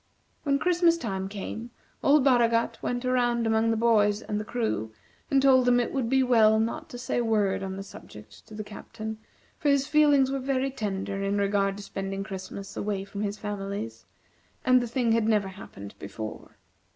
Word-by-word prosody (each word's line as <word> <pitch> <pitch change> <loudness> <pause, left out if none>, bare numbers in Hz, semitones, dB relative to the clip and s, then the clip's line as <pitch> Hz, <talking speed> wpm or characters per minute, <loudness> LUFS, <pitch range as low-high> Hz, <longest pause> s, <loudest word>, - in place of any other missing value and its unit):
When 280 -2 +1
Christmas 345 +1 +3
time 195 -9 -3
came, 215 +3 -6 0.3
old 285 0 +5
Baragat 235 -3 +2
went 245 0 -2
around 240 -2 +1
among 225 0 +2
the 225 - +1
boys 215 -2 +3
and 210 - -2
the - - -3
crew, 215 - -2 0.4
and 275 - +4
told 265 -2 +5
them 245 0 +4
it 240 - -1
would 255 -4 -1
be 265 +1 +3
well 220 -3 +5
not 225 +1 -2
to 245 - -8
say 245 - -2
a - - +1
word 210 -4 +1
on 190 -1 -4
the 195 - -5
subject 105 - -13
to 215 - -11
the 215 - -4
Captain, 215 +1 -8 0.4
for 295 - +1
his 280 -1 +3
feelings 290 -3 +4
were 275 - -1
very 270 0 -1
tender 195 -5 -3
in 200 +1 0
regard 200 0 +1
to 205 - -8
spending 195 0 -4
Christmas 195 0 -7
away 200 -2 -2
from 200 +1 -7
his 205 0 -2
families, 205 +2 -5 0.6
and 255 -1 +5
the 240 - -3
thing 235 -1 0
had 225 -1 +2
never 210 -3 +2
happened 100 - -10
before. 110 -1 -8
225 Hz, 190 wpm, -27 LUFS, 200-255 Hz, 0.6 s, old